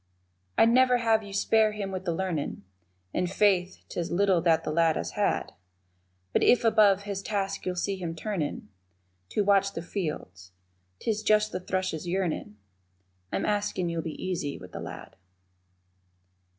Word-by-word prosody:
I'd 225 Hz, -, +6 dB
never 250 Hz, 0 st, +5 dB
have 225 Hz, -2 st, +2 dB
you 205 Hz, -2 st, -10 dB
spare 215 Hz, +2 st, +3 dB
him 200 Hz, -2 st, -4 dB
with 185 Hz, 0 st, -5 dB
the 175 Hz, -, 0 dB
learnin', 170 Hz, -3 st, -3 dB, 0.5 s
(And, 180 Hz, 0 st, 0 dB
Faith, 190 Hz, -2 st, +2 dB
'tis 170 Hz, -1 st, -3 dB
little 185 Hz, -1 st, +3 dB
that 165 Hz, -1 st, +3 dB
the -, -, -2 dB
lad 165 Hz, 0 st, +3 dB
has -, -, -3 dB
had), -, -, 0 dB, 0.8 s
But -, -, +3 dB
if 245 Hz, -, +5 dB
above 205 Hz, -3 st, +5 dB
his 200 Hz, -1 st, -4 dB
task 195 Hz, -2 st, -2 dB
you'll 180 Hz, -, -1 dB
see 195 Hz, +2 st, -1 dB
him 170 Hz, -3 st, -4 dB
turnin' 165 Hz, -, -3 dB, 0.6 s
To 210 Hz, -, +1 dB
watch 200 Hz, 0 st, +3 dB
the 165 Hz, -, -5 dB
fields 100 Hz, -, -5 dB, 0.4 s
'tis 215 Hz, -, -1 dB
just 215 Hz, -1 st, +3 dB
the 185 Hz, -, -3 dB
thrush's 185 Hz, -3 st, -2 dB
yearnin' 175 Hz, -, -2 dB, 0.7 s
I'm -, -, -1 dB
askin' 205 Hz, -4 st, 0 dB
you'll 170 Hz, -1 st, -2 dB
be 160 Hz, -1 st, -6 dB
easy 170 Hz, -6 st, -3 dB
with -, -, -12 dB
the -, -, -6 dB
lad. -, -, -9 dB
190 Hz, 160 wpm, -28 LUFS, 170-205 Hz, 0.8 s, I'd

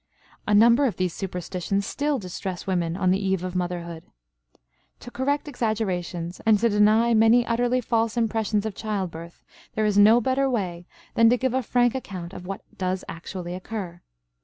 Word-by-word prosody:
A 210 Hz, -, +3 dB
number 235 Hz, +6 st, +6 dB
of 225 Hz, -, -3 dB
these 185 Hz, -2 st, -1 dB
superstitions 185 Hz, +1 st, -3 dB
still 290 Hz, +4 st, -1 dB
distress 185 Hz, -2 st, -6 dB
women 175 Hz, -3 st, -1 dB
on 185 Hz, -2 st, +2 dB
the 195 Hz, +2 st, 0 dB
eve 190 Hz, -2 st, 0 dB
of 185 Hz, -1 st, -4 dB
motherhood. 175 Hz, -2 st, -3 dB, 1.0 s
To 245 Hz, -, -10 dB
correct 285 Hz, +4 st, -1 dB
exaggerations 185 Hz, -, -3 dB
and 220 Hz, -1 st, +5 dB
to 230 Hz, +3 st, +2 dB
deny 215 Hz, +3 st, +4 dB
many 225 Hz, +2 st, +5 dB
utterly 245 Hz, +2 st, +1 dB
false 230 Hz, -1 st, 0 dB
impressions 220 Hz, -2 st, 0 dB
of 220 Hz, -, -3 dB
childbirth 185 Hz, -6 st, -5 dB, 0.3 s
there 215 Hz, -, +1 dB
is 205 Hz, -1 st, +3 dB
no 220 Hz, +3 st, +7 dB
better 265 Hz, +3 st, +1 dB
way 180 Hz, -7 st, -3 dB, 0.3 s
than 230 Hz, 0 st, +5 dB
to 245 Hz, -, +3 dB
give 260 Hz, 0 st, -1 dB
a 260 Hz, -, +1 dB
frank 245 Hz, 0 st, +2 dB
account 190 Hz, -9 st, -6 dB
of 180 Hz, -, -9 dB
what 195 Hz, 0 st, -5 dB
does 185 Hz, 0 st, -2 dB
actually 175 Hz, +1 st, -6 dB
occur. 185 Hz, -2 st, -6 dB
205 Hz, 170 wpm, -25 LUFS, 180-235 Hz, 1.0 s, no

